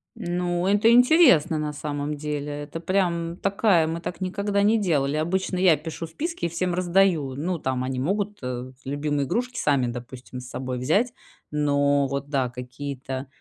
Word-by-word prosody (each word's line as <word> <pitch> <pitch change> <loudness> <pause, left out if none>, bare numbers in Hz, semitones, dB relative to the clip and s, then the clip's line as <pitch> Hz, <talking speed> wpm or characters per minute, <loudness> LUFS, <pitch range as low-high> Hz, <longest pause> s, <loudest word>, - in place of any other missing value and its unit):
Ну, 175 0 -1
это 205 +3 +4
интересно, 240 - +6
на 150 -1 -2
самом 145 0 -3
деле. 150 0 -4
Это 150 +3 -7
прям 170 -1 0
такая 195 -4 +2
мы 165 +1 -3
так 175 - -5
никогда 200 +2 0
не 215 +2 +4
делали. 150 -7 +1
Обычно 185 +4 -1
я 180 -3 +5
пишу 160 +2 -6
списки 330 - -4
и 170 - 0
всем 175 +1 -1
раздаю. 175 -6 +2
Ну, 175 +3 -2
там 130 -2 -1
они 130 0 -2
могут, 205 +7 -1
э, 125 0 -5
любимые 145 +1 -1
игрушки 245 - -2
сами, 140 -4 +2
допустим, 125 +1 -7
с 125 - -9
собой 130 -1 -4
взять, 200 - +1 0.4
но 145 -1 +2
вот, 140 +1 -4
да, 135 -4 0
какие-то 130 +1 -6
155 Hz, 165 wpm, -25 LUFS, 140-185 Hz, 0.4 s, интересно